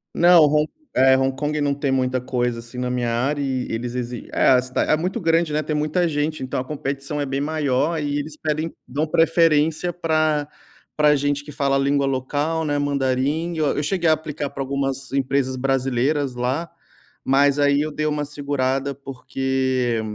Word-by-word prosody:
Não, 175 Hz, -1 st, +7 dB
Hon 150 Hz, +1 st, +3 dB, 0.3 s
é, 130 Hz, +1 st, +6 dB
Hong 135 Hz, 0 st, +1 dB
Kong 150 Hz, +2 st, -2 dB
não 145 Hz, -1 st, +1 dB
tem 140 Hz, -1 st, -1 dB
muita 130 Hz, -1 st, +1 dB
coisa, 125 Hz, -1 st, -2 dB
assim, 115 Hz, +2 st, -9 dB
na 125 Hz, 0 st, -1 dB
minha 125 Hz, -1 st, -1 dB
área 140 Hz, +5 st, 0 dB
e 130 Hz, -2 st, -2 dB
eles 120 Hz, +2 st, -3 dB
exi 125 Hz, -1 st, -5 dB
É, -, -, +3 dB
a 130 Hz, -1 st, +6 dB
cida 130 Hz, +1 st, -2 dB
é 155 Hz, -, +2 dB
muito 185 Hz, +8 st, -2 dB
grande, 165 Hz, -2 st, +2 dB
né, 150 Hz, -, +1 dB
tem 155 Hz, 0 st, -3 dB
muita 155 Hz, +4 st, +1 dB
gente, 155 Hz, 0 st, -2 dB
então 130 Hz, 0 st, -3 dB
a 130 Hz, -, -4 dB
competição 140 Hz, 0 st, -3 dB
é -, -, -1 dB
bem 135 Hz, +1 st, -2 dB
maior 150 Hz, +1 st, 0 dB
e 145 Hz, -1 st, -1 dB
eles 150 Hz, +1 st, -5 dB
pedem 155 Hz, +1 st, -2 dB
dão 145 Hz, +5 st, -1 dB
preferência 165 Hz, 0 st, +2 dB
pra 155 Hz, -3 st, 0 dB, 0.5 s
pra 150 Hz, -1 st, +5 dB
gente 145 Hz, 0 st, -1 dB
que 150 Hz, -, -9 dB
fala 140 Hz, -1 st, 0 dB
a -, -, +1 dB
língua 140 Hz, 0 st, +2 dB
local, 145 Hz, +5 st, -1 dB
né, 145 Hz, -1 st, 0 dB
mandarim, 145 Hz, +4 st, 0 dB
eu 155 Hz, -3 st, 0 dB
eu 145 Hz, -, 0 dB
cheguei 170 Hz, +1 st, +1 dB
a -, -, +6 dB
aplicar 155 Hz, -2 st, -4 dB
pra 135 Hz, -, -6 dB
algumas 135 Hz, 0 st, -3 dB
empresas 135 Hz, -1 st, 0 dB
brasileiras 135 Hz, +1 st, 0 dB
lá, 130 Hz, +7 st, -2 dB, 0.5 s
mas 140 Hz, +1 st, +3 dB
aí 140 Hz, 0 st, +3 dB
eu 155 Hz, -, -1 dB
dei 155 Hz, +1 st, -2 dB
uma 150 Hz, -1 st, -1 dB
segurada, 140 Hz, -1 st, -2 dB
porque, 130 Hz, -2 st, -1 dB
140 Hz, 190 wpm, -22 LUFS, 130-155 Hz, 0.5 s, Não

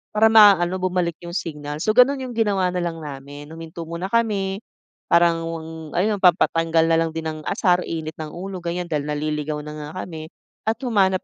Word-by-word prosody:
para 220 Hz, +1 st, +5 dB
maano 195 Hz, -4 st, +6 dB
bumalik 180 Hz, -3 st, -1 dB
'yong 170 Hz, 0 st, -8 dB
signal. 150 Hz, -3 st, -4 dB
So, 215 Hz, -, +2 dB
gano'n 260 Hz, +4 st, +4 dB
'yong 255 Hz, -, -5 dB
ginawa 205 Hz, -5 st, +1 dB
na 180 Hz, -, -2 dB
lang 165 Hz, -2 st, -4 dB
namin, 145 Hz, +1 st, -9 dB
huminto 165 Hz, +1 st, -8 dB
muna 170 Hz, +3 st, -5 dB
kami, 200 Hz, -2 st, 0 dB, 0.5 s
parang 170 Hz, -1 st, +4 dB
wang 165 Hz, -1 st, -5 dB, 0.3 s
ano 210 Hz, +3 st, +2 dB
pampatanggal 165 Hz, -2 st, +3 dB
na 165 Hz, -, +3 dB
lang 165 Hz, 0 st, +1 dB
din 160 Hz, 0 st, -4 dB
ng 155 Hz, 0 st, -4 dB
asar, 180 Hz, -2 st, +1 dB
init 160 Hz, -1 st, -5 dB
ng 155 Hz, -1 st, -7 dB
ulo, 185 Hz, +1 st, -7 dB
ganiyan, 175 Hz, +1 st, -3 dB
dahil 150 Hz, -3 st, -1 dB
naliligaw 150 Hz, 0 st, -2 dB
na 150 Hz, -, -7 dB
nga 150 Hz, -1 st, -7 dB, 0.2 s
kami 160 Hz, -2 st, -8 dB, 0.4 s
at 220 Hz, -, +2 dB
humanap 195 Hz, -6 st, +2 dB
170 Hz, 185 wpm, -22 LUFS, 160-190 Hz, 0.5 s, maano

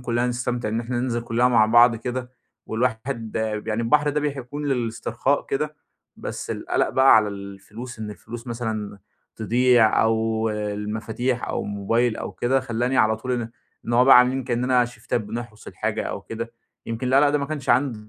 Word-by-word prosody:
كُلّنا 120 Hz, 0 st, 0 dB
نستمتع 125 Hz, -1 st, -2 dB
إن 110 Hz, +2 st, -1 dB
إحنا 120 Hz, +1 st, -3 dB
ننزل 120 Hz, -2 st, -1 dB
كُلّنا 120 Hz, +1 st, +2 dB
مع 110 Hz, -3 st, +4 dB
بعض 120 Hz, +1 st, +6 dB
كده. 125 Hz, +2 st, -4 dB, 0.4 s
والواحد 115 Hz, 0 st, -2 dB, 0.3 s
يعني 110 Hz, +1 st, -1 dB
البحر 145 Hz, +5 st, +3 dB
ده 150 Hz, -, -1 dB
بح 145 Hz, -2 st, -2 dB
بيكون 145 Hz, +4 st, -5 dB
للإسترخاء 120 Hz, +1 st, -1 dB
كده، 150 Hz, +2 st, -2 dB, 0.4 s
بس -, -, -6 dB
القَلَق -, -, 0 dB
بقى 130 Hz, -3 st, +6 dB
على 105 Hz, -1 st, +3 dB
الفلوس 100 Hz, +4 st, -9 dB
إن 105 Hz, -1 st, -5 dB
الفلوس 115 Hz, +4 st, -9 dB
مثلًا 110 Hz, -4 st, -4 dB, 0.4 s
تضيع 120 Hz, 0 st, +4 dB
أو 110 Hz, 0 st, +1 dB
المفاتيح 105 Hz, +4 st, -3 dB
أو -, -, -2 dB
الموبايل 110 Hz, +4 st, 0 dB
أو -, -, -5 dB
كده، 130 Hz, +2 st, +1 dB
خلّاني 125 Hz, +1 st, -1 dB
على 110 Hz, -1 st, +3 dB
طول 125 Hz, +3 st, -4 dB
إن 120 Hz, -2 st, -2 dB, 0.4 s
إن 120 Hz, -, -2 dB
هو 125 Hz, +2 st, +5 dB
بقى 135 Hz, -2 st, +9 dB
عاملين 130 Hz, +1 st, +2 dB
كإنّنا 125 Hz, 0 st, +2 dB
شيفتات 120 Hz, 0 st, -3 dB
بنحرُس 110 Hz, +1 st, -7 dB
الحاجة -, -, -2 dB
أو -, -, -4 dB
كده. 115 Hz, +1 st, -6 dB, 0.3 s
يمكن 115 Hz, +2 st, -3 dB
القَلَق 140 Hz, +3 st, +5 dB
ده 145 Hz, +1 st, +1 dB
ما 140 Hz, -, -2 dB
كانش 145 Hz, -3 st, -5 dB
عند 120 Hz, -4 st, +1 dB
120 Hz, 175 wpm, -23 LUFS, 110-125 Hz, 0.4 s, بقى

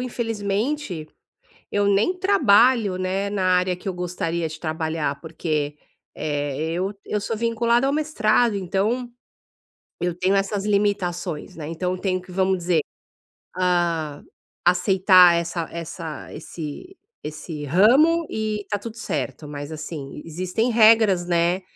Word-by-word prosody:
infelizmente, 225 Hz, -, -2 dB, 0.6 s
eu 205 Hz, 0 st, +2 dB
nem 210 Hz, -, +2 dB
trabalho, 235 Hz, -, +4 dB
né, 190 Hz, +2 st, -1 dB
na 195 Hz, -2 st, -1 dB
área 180 Hz, 0 st, 0 dB
que 180 Hz, -, -10 dB
eu 185 Hz, -, -3 dB
gostaria 170 Hz, -2 st, -2 dB
de 155 Hz, 0 st, -9 dB
trabalhar, 160 Hz, -3 st, -2 dB
porque, 155 Hz, -2 st, -2 dB, 0.4 s
eh, 145 Hz, +1 st, -2 dB
eu 185 Hz, +4 st, -2 dB
eu 210 Hz, -, -1 dB
sou 210 Hz, +2 st, -3 dB
vinculada 235 Hz, +3 st, +1 dB
ao 280 Hz, -, +1 dB
mestrado, 240 Hz, -7 st, +2 dB
então 210 Hz, +6 st, -1 dB, 0.9 s
eu 175 Hz, -1 st, -1 dB
tenho 185 Hz, +2 st, +2 dB
essas 195 Hz, +1 st, 0 dB
limitações, 195 Hz, -6 st, -1 dB
né, 150 Hz, -2 st, -6 dB
então 180 Hz, +2 st, -2 dB
eu -, -, -8 dB
tenho 185 Hz, -2 st, -1 dB
que, 180 Hz, 0 st, -14 dB
vamos 190 Hz, 0 st, +1 dB
dizer, 170 Hz, -2 st, +2 dB, 0.8 s
ah, 170 Hz, -5 st, 0 dB, 0.4 s
aceitar 180 Hz, 0 st, +6 dB
essa 170 Hz, 0 st, -2 dB
essa 165 Hz, -2 st, -7 dB
esse 170 Hz, -, -8 dB, 0.3 s
esse 155 Hz, 0 st, -6 dB
ramo 265 Hz, -, +4 dB
e 215 Hz, -1 st, -2 dB
está 205 Hz, -, -3 dB
tudo 230 Hz, +2 st, -8 dB
certo, 150 Hz, -, -4 dB
mas 145 Hz, +1 st, -7 dB
assim, 150 Hz, -2 st, -7 dB
existem 185 Hz, +8 st, -1 dB
regras, 220 Hz, -5 st, +5 dB
né, 175 Hz, +2 st, +2 dB
185 Hz, 130 wpm, -23 LUFS, 165-215 Hz, 0.9 s, aceitar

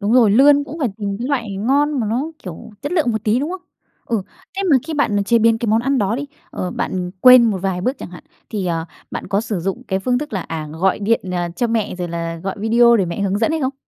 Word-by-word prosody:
đúng 205 Hz, +2 st, 0 dB
rồi, 235 Hz, -5 st, +6 dB
lươn 285 Hz, +5 st, +5 dB
cũng 295 Hz, +4 st, -8 dB
phải 275 Hz, -, +1 dB
tìm 200 Hz, -2 st, -3 dB
cái 245 Hz, -, -3 dB
loại 230 Hz, -8 st, -2 dB
ngon 280 Hz, +6 st, +1 dB
mà 220 Hz, -, -1 dB
nó 275 Hz, +8 st, -1 dB
kiểu 180 Hz, +3 st, -9 dB
chất 290 Hz, -, -3 dB
lượng 310 Hz, -9 st, +2 dB
một 220 Hz, -1 st, -3 dB
tí, 215 Hz, +3 st, +2 dB
đúng 300 Hz, -, -2 dB
không? 370 Hz, 0 st, -5 dB, 0.5 s
Ừ, 225 Hz, -5 st, -1 dB, 0.3 s
thế 395 Hz, -, -1 dB
mà 275 Hz, -, +7 dB
khi 320 Hz, -, -3 dB
bạn 205 Hz, -8 st, +1 dB
chế 235 Hz, +2 st, +3 dB
biến 225 Hz, 0 st, +3 dB
cái 235 Hz, -, -3 dB
món 220 Hz, +2 st, +3 dB
ăn 270 Hz, +2 st, 0 dB
đó 205 Hz, +3 st, 0 dB
đi, 285 Hz, -, -3 dB, 0.3 s
ờ, 180 Hz, -, -4 dB
bạn 180 Hz, -1 st, -3 dB
quên 250 Hz, -1 st, +8 dB
một 195 Hz, -, -2 dB
vài 185 Hz, -1 st, -2 dB
bước 255 Hz, +7 st, -1 dB
chẳng -, -, -8 dB
hạn, 175 Hz, -, -12 dB, 0.3 s
thì, 200 Hz, -4 st, -2 dB
ờ, 165 Hz, -1 st, -1 dB, 0.3 s
bạn -, -, -5 dB
có 200 Hz, 0 st, 0 dB
sử 215 Hz, -5 st, -3 dB
dụng 195 Hz, +8 st, -3 dB
cái 190 Hz, -1 st, 0 dB
phương 245 Hz, +5 st, 0 dB
thức 295 Hz, -4 st, -6 dB
là, 195 Hz, -, -1 dB
à, 155 Hz, -2 st, -5 dB
gọi 185 Hz, +4 st, +1 dB
điện, 220 Hz, +3 st, +1 dB
ờ, 175 Hz, -1 st, -1 dB
cho 240 Hz, -, +1 dB
mẹ 225 Hz, -4 st, -1 dB
rồi 175 Hz, -1 st, -4 dB
là 165 Hz, 0 st, -4 dB
gọi 190 Hz, +3 st, -4 dB
video 235 Hz, +2 st, +5 dB
để 195 Hz, -, +2 dB
mẹ 170 Hz, +3 st, -4 dB
hướng 200 Hz, 0 st, 0 dB
dẫn 225 Hz, -, +1 dB
hay 320 Hz, -, -1 dB
không? 265 Hz, 0 st, -1 dB
220 Hz, 275 wpm, -19 LUFS, 190-255 Hz, 0.5 s, quên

